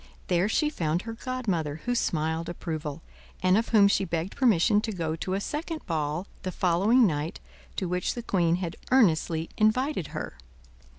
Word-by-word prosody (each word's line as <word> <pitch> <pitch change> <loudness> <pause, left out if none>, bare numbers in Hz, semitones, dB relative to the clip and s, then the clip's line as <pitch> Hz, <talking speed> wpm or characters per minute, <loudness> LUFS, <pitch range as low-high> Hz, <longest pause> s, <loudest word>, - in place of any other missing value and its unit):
There 180 +3 +2
she 300 +6 +1
found 165 - -1
her 225 - -5
godmother, 195 - -3
who 245 - +1
smiled 160 -6 -1
approval; 160 -3 -5 0.4
and 185 0 +5
of 225 +2 +1
whom 210 -3 +6
she 200 - +2
begged 170 +1 -3
permission 210 -4 +4
to 220 - -3
go 165 -5 -2
to 185 +3 -2
a - - 0
second 310 +8 -4
ball, 155 +2 -2 0.2
the 185 - -3
following 195 +8 +3
night, 155 -3 -1 0.4
to 185 - -2
which 180 +1 -1
the 240 - -5
queen 175 -6 +2
had 175 -2 -4
earnestly 165 -9 +3
invited 220 - +2
her. - - -6
185 Hz, 170 wpm, -27 LUFS, 165-225 Hz, 0.4 s, whom